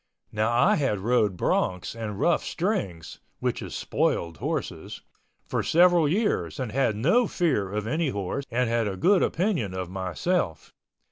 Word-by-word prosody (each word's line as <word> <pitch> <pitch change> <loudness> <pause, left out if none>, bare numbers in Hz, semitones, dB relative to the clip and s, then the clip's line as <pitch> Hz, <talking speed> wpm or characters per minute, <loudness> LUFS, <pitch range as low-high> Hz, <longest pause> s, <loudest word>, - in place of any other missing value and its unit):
Now 110 +2 0
I 150 - +4
had 135 -8 0
rode 105 -4 +1
broncs 90 +1 0
and 110 -3 -5
rough 175 - +2
strings 170 - -3 0.2
(which - - -2
is - - -6
spoiled 85 -2 -1
horses) - - -4 0.4
for - - -1
several 175 -2 +4
years 205 -3 0
and 125 -4 -3
had 120 -3 +1
no 175 - +3
fear 135 - 0
of 105 0 -2
any 155 +6 0
horse 100 +5 -3
and 125 +1 0
had 115 -1 +1
a 95 -2 -4
good 190 - +4
opinion 165 - 0
of 90 -1 -4
myself. 95 - -2
120 Hz, 155 wpm, -26 LUFS, -, 0.4 s, I